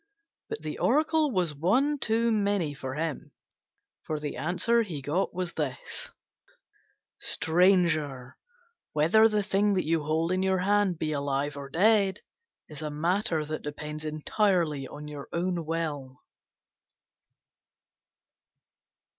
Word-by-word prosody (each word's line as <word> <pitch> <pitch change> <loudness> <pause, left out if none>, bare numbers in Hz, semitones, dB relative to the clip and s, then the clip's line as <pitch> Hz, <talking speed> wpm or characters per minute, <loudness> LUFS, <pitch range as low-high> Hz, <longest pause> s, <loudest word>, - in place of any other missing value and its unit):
But 445 - -5
the - - -5
Oracle 310 0 +3
was 180 - 0
one 255 - +2
too 230 0 +1
many 200 -7 +1
for 135 -1 -6
him, 160 -1 -4 0.7
for 155 -1 -3
the 150 -1 -4
answer 180 - +2
he 180 -10 -4
got 150 +8 -1
was 180 -1 -4
this: 140 -5 -4 1.1
"Stranger, 160 -6 +2 0.6
whether 175 +9 +5
the 210 -1 +1
thing 200 +1 +2
that 185 - 0
you 165 0 +1
hold 160 +3 0
in 185 0 +1
your 190 0 +2
hand 200 -1 +2
be 155 -1 -2
alive 140 0 -1
or 140 -1 -7
dead 195 +3 +3 0.5
is 150 -1 -8
a 155 - -3
matter 165 +1 0
that 155 +1 -4
depends 150 +1 -6
entirely 155 -2 0
on 150 +3 -9
your 145 -2 -8
own 170 -1 -2
will." 150 -6 -3
165 Hz, 125 wpm, -28 LUFS, 150-195 Hz, 1.1 s, whether